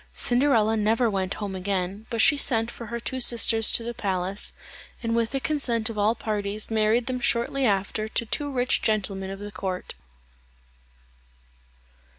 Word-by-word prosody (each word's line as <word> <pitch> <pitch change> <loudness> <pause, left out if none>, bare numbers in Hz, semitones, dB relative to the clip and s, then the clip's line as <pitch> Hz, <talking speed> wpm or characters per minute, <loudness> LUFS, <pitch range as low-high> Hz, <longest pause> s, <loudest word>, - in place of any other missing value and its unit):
Cinderella 240 -4 +2
never 225 +2 +2
went 190 -1 -2
home 200 -2 -5
again, 190 +2 -3
but 230 -1 0
she 295 - +5
sent 230 -5 +2
for 235 - -9
her 235 +2 -4
two 260 +2 -4
sisters 230 -2 +4
to 230 - 0
the 235 +1 -4
palace, 190 -2 -1 0.5
and 230 0 0
with 230 -1 +1
the 270 - -2
consent 245 -7 0
of 215 - -9
all 215 +3 +2
parties 210 -1 -2
married 220 +2 +2
them 255 -1 -2
shortly 245 +2 +1
after 200 +1 -1
to 235 - 0
two 290 +6 -2
rich 250 -1 0
gentlemen 195 -3 -1
of 195 - -6
the 205 +1 -8
court. 185 -1 -5
220 Hz, 160 wpm, -25 LUFS, 200-235 Hz, 0.5 s, she